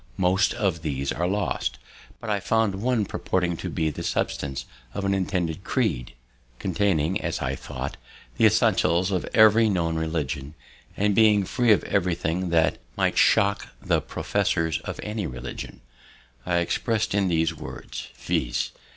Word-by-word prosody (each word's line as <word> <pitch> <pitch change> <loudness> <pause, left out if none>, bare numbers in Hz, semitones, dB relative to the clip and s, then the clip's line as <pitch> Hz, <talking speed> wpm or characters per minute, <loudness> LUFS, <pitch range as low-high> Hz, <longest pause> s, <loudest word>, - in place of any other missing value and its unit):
Most 95 +4 +2
of 95 -8 0
these 70 -3 -2
are 85 +2 -1
lost; 100 -10 -1 0.4
but 115 - -8
I 105 -1 +1
find 100 -1 +1
one 120 -3 +1
purporting 90 -2 -1
to - - -4
be 80 -1 0
the - - -7
substance 70 -1 -2 0.3
of 100 - -2
an 100 - +2
intended 95 -2 -1
creed, 75 - -1 0.4
containing, 95 -1 0
as - - -2
I - - -1
thought, - - -6 0.4
the - - +6
essentials 90 +4 +2
of 90 -2 0
every 110 0 +6
known 85 -4 0
religion, 75 -3 -3 0.4
and 105 0 +2
being 105 -2 +5
free 120 +4 +2
of 105 - +4
everything 90 -2 0
that 80 -1 +2 0.2
might - - +1
shock 100 0 +3
the - - +1
professors 80 -1 0
of - - -5
any 105 -4 -3
religion. 65 0 -7 0.7
It 90 - 0
is 85 - +3
express'd 110 +5 -1
in 100 -1 +2
these 80 -2 +1
words, - - -8
viz. - - -1
90 Hz, 150 wpm, -25 LUFS, 80-105 Hz, 0.7 s, the